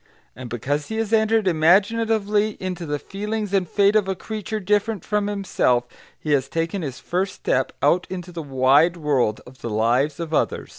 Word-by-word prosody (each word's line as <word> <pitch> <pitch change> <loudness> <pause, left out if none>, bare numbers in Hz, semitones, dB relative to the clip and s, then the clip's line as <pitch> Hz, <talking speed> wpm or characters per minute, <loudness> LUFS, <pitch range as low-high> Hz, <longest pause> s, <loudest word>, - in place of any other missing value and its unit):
And 125 -1 -8
because 145 +6 -2
he 220 - -5
has 225 0 -2
entered 220 -1 +3
imaginatively 205 +5 +2
into 180 -3 -4
the 145 0 -1
feelings 210 +4 -4
and 185 -4 +1
fate 200 0 +3
of 210 -3 +3
a 190 - -1
creature 215 +2 -5
different 205 0 0
from 210 -1 0
himself, 190 -12 +1 0.3
he 150 - -4
has 135 -2 +2
taken 165 +5 -2
his 135 -6 -5
first 185 +2 -2
step 130 0 0
out 170 +5 +3
into 180 -1 -6
the 170 -1 -5
wide 140 +4 +3
world 135 -9 0
of 130 +1 -16
the 115 - -4
lives 120 +8 +1
of 165 -1 -5
others. - - 0
180 Hz, 185 wpm, -22 LUFS, 145-205 Hz, 0.3 s, entered